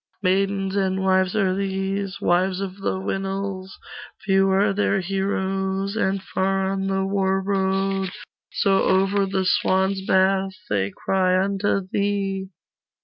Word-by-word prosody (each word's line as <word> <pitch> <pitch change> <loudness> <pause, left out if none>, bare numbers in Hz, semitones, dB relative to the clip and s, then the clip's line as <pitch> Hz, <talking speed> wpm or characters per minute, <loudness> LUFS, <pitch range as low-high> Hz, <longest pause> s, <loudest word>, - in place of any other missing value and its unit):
Maidens 195 +1 +1
and 190 -1 0
wives 185 0 +2
are 195 -3 +2
these 195 0 -2
Wives 185 +2 +1
of 195 -1 -5
the 195 - -2
Winils; 195 0 -4 0.5
Few 195 0 +3
are 195 +1 +3
their 195 -1 +1
heroes 195 +1 -2
And 195 -3 0
far 190 0 0
on 195 0 -2
the 195 0 0
war 195 -1 +1
road, 195 0 0 0.4
So 195 -1 +2
over 195 +1 +2
the 190 -1 -1
swans' 190 +1 +2
bath 190 0 +2 0.2
They 100 -1 +1
cry 185 - +1
unto 195 +1 0
thee. 195 -1 -1
195 Hz, 130 wpm, -23 LUFS, 190-195 Hz, 0.5 s, Few